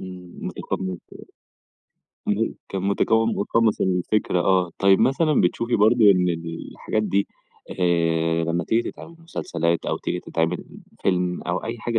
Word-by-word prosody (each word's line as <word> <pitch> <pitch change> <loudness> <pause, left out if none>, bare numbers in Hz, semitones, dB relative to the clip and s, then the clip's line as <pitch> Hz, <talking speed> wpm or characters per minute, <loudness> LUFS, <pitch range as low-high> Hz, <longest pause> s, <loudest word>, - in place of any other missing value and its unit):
إمم، 90 -1 -10
مُتقمّص 95 - -4 1.4
الدور. - - +2
اهم، - - -7
كان 95 -1 -3
مُتكو 110 +3 +2
مُتقمّص 115 0 +1
الفكرة، 90 0 +1
آه. 90 -1 +2
طب 100 -1 +5
مثلًا 150 +3 +3
بتشوفي 115 +7 +1
برضه 110 +2 +4
إن 90 -2 +3
الحاجات 85 +5 -3
دي، 100 -1 +1 0.5
آآ، 85 -1 +2
لمّا 85 0 -1
تيجي 115 +1 0
تتعِمِل 165 - -12
مُسلسلات 85 - -2
أو - - 0
تيجي - - -3
تتعمل 80 0 -2 0.4
فيلم 90 -1 0
أو 90 +1 -2
أي 115 +1 -4
حاجة 115 0 -1
95 Hz, 140 wpm, -23 LUFS, 85-110 Hz, 1.4 s, طب